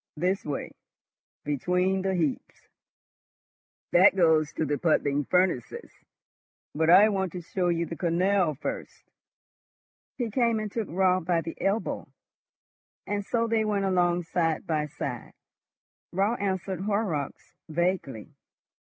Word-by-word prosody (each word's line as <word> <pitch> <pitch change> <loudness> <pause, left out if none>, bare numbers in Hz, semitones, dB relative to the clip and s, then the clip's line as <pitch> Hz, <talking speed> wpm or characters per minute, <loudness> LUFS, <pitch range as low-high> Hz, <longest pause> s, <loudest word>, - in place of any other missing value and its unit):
This 185 +5 0
way, 145 -2 -4 0.7
between 180 +7 0
the 190 0 0
heaps. 160 -6 -3 1.2
That 185 +2 +6
goes 160 -4 +3
to 160 - -1
the 145 0 -1
puddling 145 -3 +1
furnaces, 180 -9 0 0.8
but 160 +2 +1
I 190 +5 +8
want 190 -3 -1
to 180 - -5
show 180 +2 -2
you 170 -1 +1
the 165 - -6
canal 175 -1 +1
first." - - -6 1.1
He 235 -4 -2
came 235 -1 +2
and 215 -1 -4
took 225 -3 -3
Raut 185 0 +2
by 170 -2 +1
the 165 +1 -6
elbow, 200 +3 -1 1.0
and 205 0 -2
so 230 +3 0
they 225 -1 +1
went 205 -2 0
along 175 -2 +2
side 165 -1 -1
by 155 -3 -1
side. 130 -4 -6 0.8
Raut 200 +6 0
answered 190 -2 -2
Horrocks 195 -8 -2 0.2
vaguely. 160 - -2
180 Hz, 125 wpm, -27 LUFS, 160-195 Hz, 1.2 s, I